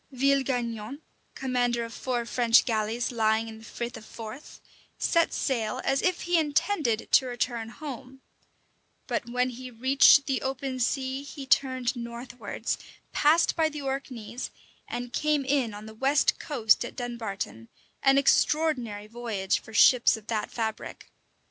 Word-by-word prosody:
Villegaignon, 260 -2 0 0.3
commander 245 -3 0
of 230 - -9
four 245 -2 -2
French 235 0 +4
galleys 225 +1 -1
lying 220 -1 +1
in 220 0 -9
the - - -15
Frith 235 +1 -5
of - - -9
Forth, 225 +5 -10 0.4
set 335 -1 +2
sail 230 -5 -1
as 270 0 +1
if 365 -1 0
he 345 0 +2
intended 295 - 0
to 260 - +5
return 240 -2 -2
home; 265 -1 -9 0.8
but 240 - -3
when 250 +1 0
he 255 +1 -8
reached 265 +4 +5
the 270 -2 -1
open 265 0 -3
sea 265 +2 -1
he 285 -1 -8
turned 260 -2 +2
northwards, 240 +1 -5 0.3
passed 315 +3 +3
by 320 -2 +2
the 300 -2 -7
Orkneys, 255 -4 -4 0.4
and 245 0 -5
came 300 -2 +1
in 265 -4 +1
on 210 +1 -9
the 220 - -10
west 270 +5 +2
coast 235 -8 +2
at - - -7
Dunbarton; 220 - -5 0.3
an 270 0 +5
extraordinary 275 -7 +2
voyage 215 -4 -2
for - - -14
ships 235 +2 +5
of 215 - -14
that 220 -2 -2
fabric. 220 -2 -5
245 Hz, 145 wpm, -27 LUFS, 230-275 Hz, 0.8 s, to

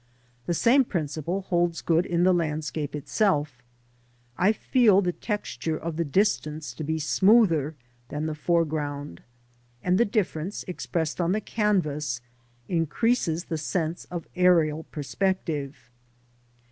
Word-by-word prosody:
The 175 - +1
same 255 - +5
principle 170 - -3
holds 175 -2 0
good 170 +1 +2
in 170 0 +1
the 185 0 +5
landscape 155 -3 -2
itself; 150 - 0 0.7
I 190 +9 +4
feel 220 -3 +4
the 180 -3 +1
texture 165 - -3
of 165 0 -5
the 170 - 0
distance 155 - 0
to 140 - -6
be 160 +2 -1
smoother 165 - +3 0.3
than 150 +1 -3
the 155 - -2
foreground, 150 - -1 0.6
and 180 +1 +2
the - - +6
difference, 200 -4 -2
expressed 170 -2 -2
on 170 +2 +1
the 215 - +1
canvas, 155 - 0 0.5
increases 170 - 0
the 160 -2 -3
sense 165 +1 -2
of 175 -2 -6
aerial 165 -4 +3
perspective. 150 -5 -3
165 Hz, 125 wpm, -26 LUFS, 150-185 Hz, 0.7 s, the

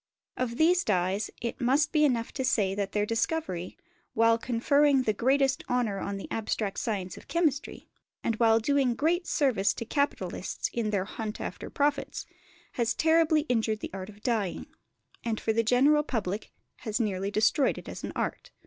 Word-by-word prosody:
Of 240 -2 -2
these 345 +2 +4
dyes 190 +1 0
it 235 +3 -4
must 275 +5 +2
be 305 -1 +3
enough 240 -6 +1
to 265 - -3
say 205 -6 +2
that 200 0 -2
their 210 0 +1
discovery, 225 - -2 0.4
while 230 0 +4
conferring 270 +4 +3
the 215 - +1
greatest 265 +4 +2
honour 235 -5 0
on 200 +1 -3
the 195 - -7
abstract 215 -2 -2
science 190 -6 -3
of - - -13
chemistry, 310 -5 -1 0.4
and 230 - 0
while 225 -1 +5
doing 265 0 +2
great 345 +6 +1
service 225 -9 +2
to 230 - -5
capitalists 280 +4 -2
in 230 -3 -1
their 200 -3 0
hunt 215 +1 -5
after - - -6
profits, 290 0 -1 0.5
has 235 -1 0
terribly 320 -1 +4
injured 225 -6 0
the - - -5
art 190 0 -6
of 210 0 -15
dyeing, 215 -7 -1 0.6
and 225 -2 -1
for 220 - 0
the 230 - +3
general 265 +6 +4
public 215 -8 -3 0.3
has 220 -2 -3
nearly 200 -3 -1
destroyed 220 +7 +2
it - - -9
as - - -7
an - - -4
art. - - -3
230 Hz, 175 wpm, -28 LUFS, 210-280 Hz, 0.6 s, while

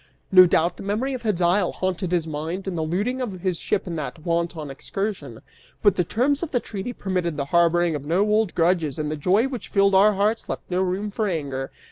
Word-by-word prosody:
No 185 -1 +9
doubt 170 +1 +1
the - - -9
memory 215 +7 -1
of 255 - -4
Hedyle 180 -3 +1
haunted 185 -1 -2
his 175 -3 +1
mind, 160 +5 -4
and 190 - -2
the 165 - -1
looting 205 +11 -1
of 195 -8 -4
his 180 -3 -1
ship - - -1
in 175 -3 -4
that 155 +2 -6
wanton 170 -3 -2
excursion. 150 - -5 0.4
But 205 -4 +5
the 180 - +2
terms 265 - 0
of 340 - -3
the 250 - +1
treaty 210 +1 -5
permitted 180 -8 -2
the 140 - -1
harboring 170 0 +3
of 145 -2 -4
no 170 +6 +1
old 210 -2 +1
grudges 165 -4 +1
and 150 -1 -2
the - - -1
joy 190 - +2
which 255 -4 -6
filled 200 -1 +3
our 205 +3 +6
hearts 210 +3 0
left - - -4
no 180 +1 +1
room 190 +3 -1
for 215 +1 -1
anger. 140 -7 -3
185 Hz, 220 wpm, -23 LUFS, 165-205 Hz, 0.4 s, No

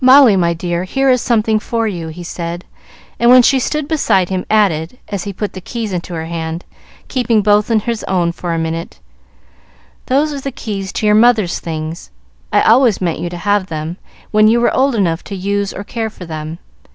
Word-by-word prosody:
"Molly, 260 -4 +7
my 170 -2 +1
dear, 175 +1 -2
here 270 +7 +2
is 250 -2 +2
something 220 -2 +2
for 230 +1 -1
you," 175 -6 -4
he 165 +2 -8
said; 170 0 -5 0.5
and 235 - +4
when 250 0 +8
she 270 +2 +4
stood 300 +3 -2
beside 235 - +1
him, 185 -1 -3
added, 195 -2 +1
as 200 -2 -4
he 200 - -3
put 205 +2 -4
the 185 - -8
keys 225 0 -4
into 175 0 -4
her 160 0 -4
hand, 165 0 -5 0.4
keeping 235 -5 +1
both 210 +1 +3
in 225 -2 +2
his 230 0 -3
own 175 -3 +1
for 175 0 -5
a 165 - 0
minute, 165 +1 -4 1.1
"Those 290 +3 +1
are 280 - -5
the 275 - -4
keys 200 -5 -5
to - - -2
your 210 - +4
mother's 215 -4 +3
things. 160 0 -5 0.4
I - - +3
always 235 -2 +4
meant 170 -3 -1
you 175 - -3
to 175 - -7
have 205 +1 0
them, 160 +1 -5 0.3
when 215 0 +5
you 230 +2 +4
were 240 - +2
old 270 -1 +2
enough 175 -5 0
to 200 - -6
use 200 +1 -1
or 200 - -6
care 225 +1 -3
for 190 -4 -11
them. 155 0 -6
200 Hz, 210 wpm, -16 LUFS, 170-230 Hz, 1.1 s, when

